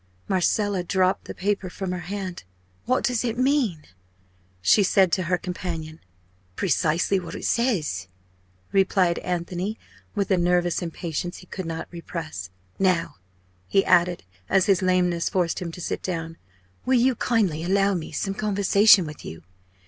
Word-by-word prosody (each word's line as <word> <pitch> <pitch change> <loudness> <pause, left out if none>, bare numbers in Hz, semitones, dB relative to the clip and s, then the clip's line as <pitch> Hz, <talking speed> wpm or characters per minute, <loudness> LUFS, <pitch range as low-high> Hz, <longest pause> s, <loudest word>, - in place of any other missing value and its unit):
Marcella 195 +1 +1
dropped 185 +1 +1
the - - -7
paper 195 -1 -1
from 190 0 -4
her 180 - -3
hand. 190 -3 -5 0.4
"What 255 +1 +1
does 250 -3 +1
it 235 -1 -2
mean?" 255 - +1 0.8
she 95 - +4
said 190 -2 +4
to 185 - +1
her 180 - +3
companion. 170 -4 -5 0.6
"Precisely 170 - +1
what 175 - -8
it - - -6
says," 160 - 0 0.6
replied 190 -3 +2
Anthony, 180 +4 -3 0.4
with 200 -1 -1
a 190 - +4
nervous 175 0 +1
impatience 170 0 -4
he - - -13
could 185 -1 -6
not 165 0 -4
repress. 160 - -6 0.3
"Now," 180 - +1 0.5
he 195 - +3
added, 175 - +3 0.3
as 190 -1 +4
his 195 -3 +3
lameness 180 -2 +2
forced 175 -3 0
him 175 -2 -5
to 180 - -9
sit - - -3
down, 165 -2 -4 0.5
"will 255 0 +3
you 255 +2 +4
kindly 205 -10 0
allow 195 +2 +2
me 170 -4 -4
some 195 +5 -2
conversation 200 -1 +4
with 150 -1 -9
you? 80 +1 -9
185 Hz, 150 wpm, -24 LUFS, 170-200 Hz, 0.8 s, she